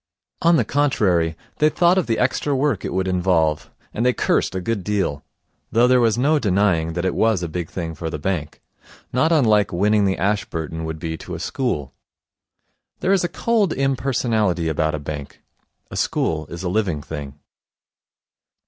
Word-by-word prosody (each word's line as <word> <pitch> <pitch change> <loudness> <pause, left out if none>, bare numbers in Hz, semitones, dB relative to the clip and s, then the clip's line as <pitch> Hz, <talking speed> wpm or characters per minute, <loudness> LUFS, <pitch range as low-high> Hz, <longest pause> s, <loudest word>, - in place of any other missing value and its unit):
On 170 +1 +5
the - - +2
contrary, 95 - +1 0.2
they 150 - +5
thought 175 +4 +3
of 185 - -2
the 115 - +1
extra 135 +2 0
work 135 -6 0
it - - -3
would 95 +1 -1
involve; 90 -4 +1 0.2
and 115 - -1
they 125 0 +3
cursed - - 0
a - - 0
good 100 +1 -2
deal, 95 -8 -1 0.5
though 120 +2 +4
there 125 0 +5
was 115 -1 +2
no 150 +5 +3
denying 90 - +1
that 85 +2 -2
it 95 - +1
was 110 -5 +2
a - - -1
big 85 0 -4
thing 85 -3 -4
for 80 +1 -5
the 75 - -4
bank 75 -2 -3 0.5
not 155 +7 +2
unlike 110 - +3
winning 105 +3 +2
the 95 -1 +1
Ashburton 80 -6 -2
would 80 0 -4
be 80 +1 -4
to 90 - -7
a - - -6
school. 90 - -2 1.1
There 190 - +2
is 190 - +2
a 175 - 0
cold 210 -1 +1
impersonality 120 -10 0
about 80 0 0
a - - -3
bank. 70 -1 -7 0.5
A - - -6
school 80 -1 -1
is 85 +2 -7
a - - -1
living 90 -6 -1
thing. 70 -2 -7
95 Hz, 180 wpm, -21 LUFS, 80-125 Hz, 1.1 s, On